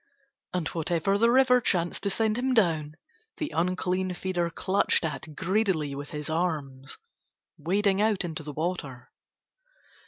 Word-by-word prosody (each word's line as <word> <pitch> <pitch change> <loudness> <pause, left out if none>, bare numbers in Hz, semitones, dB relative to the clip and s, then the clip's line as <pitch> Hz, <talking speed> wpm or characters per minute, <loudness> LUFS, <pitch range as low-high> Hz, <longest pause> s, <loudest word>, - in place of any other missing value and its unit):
And 180 -3 -1
whatever 170 +4 0
the 230 +1 +5
river 250 0 +5
chanced 175 -6 0
to 200 - 0
send 215 +2 +2
him 260 0 +1
down 160 -8 +2 0.4
the 305 -2 -3
unclean 180 +1 0
feeder 175 -2 -1
clutched 185 +1 +1
at 155 0 -5
greedily 185 -6 0
with 145 +1 -6
his 150 -1 -5
arms, 150 -5 -2 0.6
wading 195 +5 +1
out 210 -4 +2
into 160 -2 -5
the 150 -1 -6
water. 145 -5 -4
175 Hz, 135 wpm, -27 LUFS, 155-200 Hz, 0.6 s, the